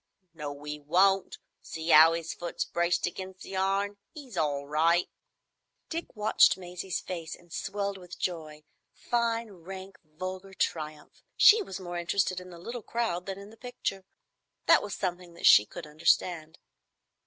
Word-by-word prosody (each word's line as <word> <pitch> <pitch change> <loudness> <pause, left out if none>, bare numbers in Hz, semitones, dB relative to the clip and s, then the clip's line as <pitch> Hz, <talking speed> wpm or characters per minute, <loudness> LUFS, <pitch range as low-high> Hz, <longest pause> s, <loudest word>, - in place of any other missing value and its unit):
"No, 145 -2 -7
'e 150 0 -4
won't. 190 +6 +2 0.2
See 160 +1 -1
'ow 160 +2 +9
'is 165 -1 -3
foot's 175 - -4
braced 170 0 +1
against 185 +1 -6
the 195 - -7
iron? 195 +2 0 0.2
'E's 270 -8 -10
all 145 -4 0
right." 165 +4 +3 0.8
Dick 335 -4 -5
watched 210 -2 +5
Maisie's 180 0 -4
face 170 -3 -6
and 175 -1 -17
swelled 200 -1 -3
with 180 -1 -10
joy—fine, 195 +8 -3
rank, 190 +2 -10
vulgar 185 +5 -7
triumph. 155 -4 -3 0.2
She 440 +1 +8
was 195 - -6
more 175 -1 -5
interested 185 +1 0
in 180 - -11
the 175 - -11
little 235 +8 -6
crowd 210 -6 -2
than 195 -1 -4
in 200 +1 -11
the 225 - -16
picture. 240 -5 -4 0.6
That - - +6
was 200 -3 -5
something 180 -2 -4
that - - -5
she 105 - +8
could - - -8
understand. 160 +1 +1
180 Hz, 155 wpm, -29 LUFS, 165-195 Hz, 0.8 s, ow